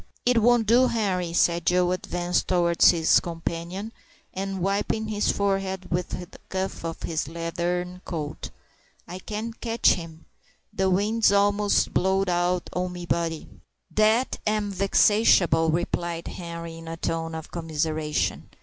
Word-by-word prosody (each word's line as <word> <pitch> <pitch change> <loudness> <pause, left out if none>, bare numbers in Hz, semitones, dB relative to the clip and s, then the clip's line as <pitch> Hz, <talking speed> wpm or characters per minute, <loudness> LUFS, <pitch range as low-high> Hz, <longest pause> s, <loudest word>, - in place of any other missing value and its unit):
"It 245 -1 +4
won't 240 0 +4
do, 240 +4 +5
Henri," 190 -7 -1
said 170 0 +2
Joe, 180 0 +3
advancing 175 -1 -1
towards 175 -2 +4
his 165 -2 +4
companion, 170 +5 -5 0.4
and 195 0 -4
wiping 200 +3 -1
his 210 -1 +1
forehead 195 -2 -2
with 175 +1 -1
the 180 +1 -8
cuff 190 -2 -3
of 165 -1 -5
his 160 -4 -2
leathern 175 +2 -3
coat; 155 -4 -5 0.6
"I 180 - -7
can't 220 +3 -6
catch 230 0 +3
him. 165 -2 -5 0.5
The 190 0 +1
wind's 210 +4 +2
a'most 205 0 +2
blowed 190 +1 +1
out 175 0 0
o' 180 0 -1
me 175 -1 -7
body." 165 -2 -2 0.5
"Dat 220 +4 +2
am 210 -1 0
vexatiable," 195 -4 +4
replied 170 0 -2
Henri, 170 -1 -7
in 165 - -11
a 165 0 -5
tone 165 0 -3
of 160 -1 -8
commiseration. 155 -2 -2
180 Hz, 140 wpm, -25 LUFS, 170-200 Hz, 0.6 s, do